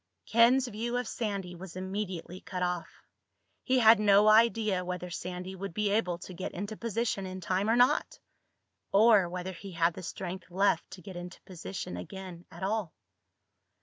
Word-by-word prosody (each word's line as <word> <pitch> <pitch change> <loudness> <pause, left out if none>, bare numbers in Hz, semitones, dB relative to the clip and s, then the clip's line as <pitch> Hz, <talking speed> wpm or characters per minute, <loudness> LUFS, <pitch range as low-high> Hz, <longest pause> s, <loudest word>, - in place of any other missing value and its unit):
Ken's 245 +3 +5
view 235 +2 -3
of 245 -2 -2
Sandy 200 -6 -3
was 180 0 -10
immediately 185 -2 -4
cut 180 -1 -4
off. 180 -1 -3 0.6
He 260 0 +2
had 225 -2 +7
no 205 0 +5
idea 215 -3 +4
whether 180 0 -5
Sandy 180 +1 -5
would 190 -2 -6
be 210 -1 +1
able 195 -5 +1
to 185 +1 -10
get 185 - -5
into 205 +4 -5
position 230 -3 -2
in 185 0 -6
time 185 +3 0
or 230 - +4
not—or 220 -4 +1
whether 180 +1 -4
he 190 +1 -9
had 170 0 +2
the 185 - -8
strength 185 +1 -6
left 185 -2 +1
to 180 - -11
get 190 0 -9
into 175 +1 -8
position 95 - -6
again 180 - -8
at 170 +3 -10
all. 200 -3 -1
190 Hz, 165 wpm, -30 LUFS, 180-215 Hz, 0.6 s, had